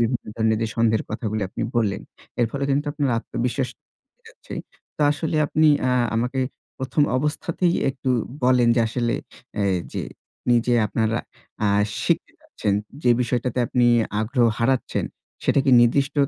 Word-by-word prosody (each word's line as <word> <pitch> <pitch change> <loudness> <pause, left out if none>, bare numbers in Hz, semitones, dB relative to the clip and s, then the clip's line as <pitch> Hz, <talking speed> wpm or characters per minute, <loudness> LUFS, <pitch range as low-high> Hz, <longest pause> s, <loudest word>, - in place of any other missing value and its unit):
বিভিন্ন 120 +1 0
ধরনের 110 -1 +2
যে - - +1
সন্দেহের 115 -1 +2
কথাগুলো 110 -1 -2
আপনি - - -5
বললেন। 100 -4 +1 0.4
এর 120 - +4
ফলে 140 +2 -2
কিন্তু 145 +2 +1
আপনার 145 -3 -1
আত্মবিশ্বাস 125 +2 -2 0.5
চলে - - -44
যাচ্ছে। 480 - -11 0.4
তো - - -9
আসলে 155 +2 -1
আপনি 155 +1 +3 0.2
আ - - +2 0.2
আমাকে 125 +3 0 0.4
প্রথম 130 +3 0
অবস্থাতেই 170 +5 0 0.2
একটু 130 0 -5 0.4
বলেন 125 -2 +4
যে - - +4
আসলে 120 0 -1 0.4
অ্যা 105 - -1 0.3
যে - - -2 0.5
নিজে 120 0 +3
আপনারা 110 +2 0 0.5
আ - - +3 0.4
শিখতে 170 - 0
যাচ্ছেন, 305 - -3 0.3
যে 125 - +4
বিষয়টাতে 125 +1 -1
আপনি 120 +1 +2 0.4
আগ্রহ 120 +2 +2
হারাচ্ছেন 130 +2 0 0.4
সেটা - - +3
কি 135 - +3
নির্দিষ্ট 135 +5 +2
125 Hz, 145 wpm, -23 LUFS, 115-140 Hz, 0.5 s, এর